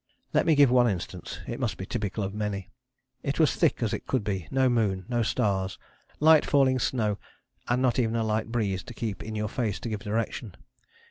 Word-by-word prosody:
Let - - +3
me 160 - +5
give 140 -3 +6
one 125 -1 +5
instance: 95 -5 -5
it - - -5
must - - -1
be 95 - -5
typical 105 -1 -3
of 100 0 -3
many. 105 -3 -3 0.5
It 140 - -2
was 155 -5 +4
thick - - +2
as 110 - 0
it - - -4
could 130 -5 0
be, 95 -5 -3
no 130 0 +3
moon, 105 -6 +1
no 120 -1 0
stars, 100 -5 0 0.4
light 155 0 +7
falling 135 -2 +3
snow, 110 -4 0 0.5
and 125 +2 +1
not 125 -1 +2
even 115 -2 +1
a 115 - +1
light 110 0 0
breeze 100 -5 0
to 120 - -9
keep 110 -5 -4
in 110 0 -6
your 105 0 -1
face 110 -2 -2
to 120 - -4
give 105 -2 -3
direction. 110 0 -3
110 Hz, 210 wpm, -27 LUFS, 100-125 Hz, 0.5 s, light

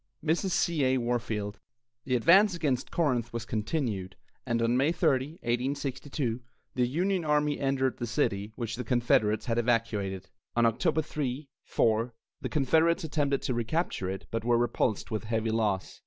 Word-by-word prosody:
MRS. 170 +5 +1
C. 170 -4 +1
A. 130 0 +3
WARFIELD. 115 -4 -2 0.5
The 125 - +1
advance 185 - +5
against 145 -7 -1
Corinth 125 -8 0
was 115 -1 -4
continued, 110 - -2 0.3
and 115 -1 +1
on 115 +1 +2
May 135 +5 +3
30, 150 -4 +1
1862, 130 0 -2 0.3
the 125 -1 +1
Union 180 +7 0
army 150 -1 +1
entered 135 -1 0
the 120 - -3
city, 105 -2 -1
which 115 -2 -4
the 125 - -3
Confederates 115 -3 +2
had 115 -1 0
evacuated. 110 -5 -1 0.2
On 120 0 +4
October 115 +7 +2
3, 145 -1 -3 0.2
4, 115 +1 +1 0.3
the - - -3
Confederates 160 +4 +2
attempted 145 -3 0
to 130 - -1
recapture 120 - -1
it, 95 0 -5
but 115 -1 -2
were 120 0 +3
repulsed 120 -2 0
with 110 0 -2
heavy 110 0 -1
loss. 105 -4 -1
125 Hz, 155 wpm, -29 LUFS, 115-145 Hz, 0.5 s, advance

